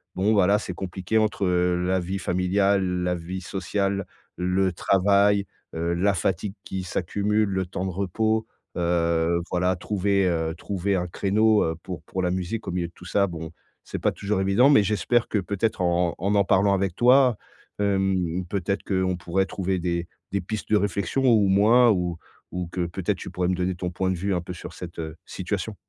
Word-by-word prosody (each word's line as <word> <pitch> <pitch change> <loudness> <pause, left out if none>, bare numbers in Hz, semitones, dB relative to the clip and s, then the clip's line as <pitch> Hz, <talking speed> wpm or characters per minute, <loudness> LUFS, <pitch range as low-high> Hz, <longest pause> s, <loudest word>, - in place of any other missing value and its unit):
bon, 100 +4 +2
voilà, 100 0 +4
c'est 90 - -5
compliqué 95 +3 -2
entre 105 -3 +1
la 90 +1 +1
vie 95 +3 -3
familiale, 95 0 +1
la 90 0 0
vie 90 +3 -6
sociale, 100 +1 -2 0.3
le 90 +1 +1
travail, 100 +2 +3 0.3
heu, 85 +1 -1
la 100 +3 +2
fatigue 95 +2 -1
qui 95 -1 -4
s'accumule, 100 +4 0
le 95 -1 -1
temps 90 +1 -4
de 95 - -2
repos. 110 +4 0 0.3
Heu, 85 0 +1
voilà, 90 +1 +1
trouver, 100 +1 0
heu, 80 -1 -1
trouver 100 +1 -1
un 90 -1 -1
créneau, 105 +4 +2
heu, 80 0 -1
pour 90 -5 -7
pour 95 +4 -4
la 90 - +1
musique, 95 +4 -3
au - - -2
milieu 85 -1 -1
de 85 - -18
tout - - -15
ça, 100 +3 +2
bon, 80 -1 -7 0.3
c'est - - -6
pas - - +1
toujours 100 0 -2
évident. 100 +8 +4
Mais 140 -8 +6
j'espère 110 +3 +1
que, 105 - 0
peut-être, 100 +1 -1
en 85 -1 +1
en 95 +4 -1
m'en 100 -2 +3
parlant 100 +1 +3
avec 95 -3 0
toi, 125 -1 +5 0.4
hem, 95 -3 0
peut-être 100 0 -2
qu'on 95 -2 0
pourrait 90 +3 0
trouver 95 -1 -2
des 85 0 -2 0.2
des 100 - 0
pistes 110 +4 -5
de 105 - +6
réflexion, 100 +6 -1
ou 110 -5 +5
moins, 115 +5 +5
ou 90 -3 -1 0.3
ou 90 -1 -3
que, 90 -2 -1
peut-être, 85 - -2
tu - - -7
pourrais 90 -1 -1
me 90 - +1
donner 90 0 -1
ton 90 0 -4
point 95 +1 -1
de 95 - 0
vue, 100 +3 -1
un 90 - -1
peu, 90 - -8
sur 90 - -9
cette, 85 -1 -9
heu 80 0 -5
situation. - - -4
95 Hz, 195 wpm, -25 LUFS, 90-100 Hz, 0.4 s, Mais